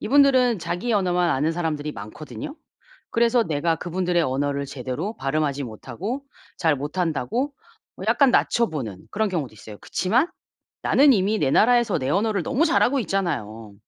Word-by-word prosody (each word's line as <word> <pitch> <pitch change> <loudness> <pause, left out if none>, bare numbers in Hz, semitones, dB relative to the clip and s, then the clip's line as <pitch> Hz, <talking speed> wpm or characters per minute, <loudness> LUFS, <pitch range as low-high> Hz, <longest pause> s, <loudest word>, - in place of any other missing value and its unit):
이분들은 260 -5 +4
자기 180 +8 -2
언어만 180 -4 +2
아는 150 +5 +1
사람들이 155 -3 -2
많거든요. 155 - -8 0.5
그래서 235 0 +3
내가 160 -2 0
그분들의 175 0 0
언어를 140 +1 -1
제대로 140 - -4
발음하지 140 0 -1
못하고 135 - -5 0.3
잘 160 -4 +2
못한다고 165 - -2 0.4
뭐 - - -7
약간 275 -3 +5
낮춰보는 150 - 0
그런 215 +1 0
경우도 160 - -3
있어요. 105 0 -11
그치만 240 - +1 0.5
나는 280 0 +5
이미 210 0 +1
내 135 -6 +1
나라에서 235 -3 +4
내 130 - -3
언어를 205 +4 +1
너무 265 +5 +2
잘하고 280 -4 +3
있잖아요. 115 - -3
175 Hz, 370 characters per minute, -23 LUFS, 140-235 Hz, 0.5 s, 약간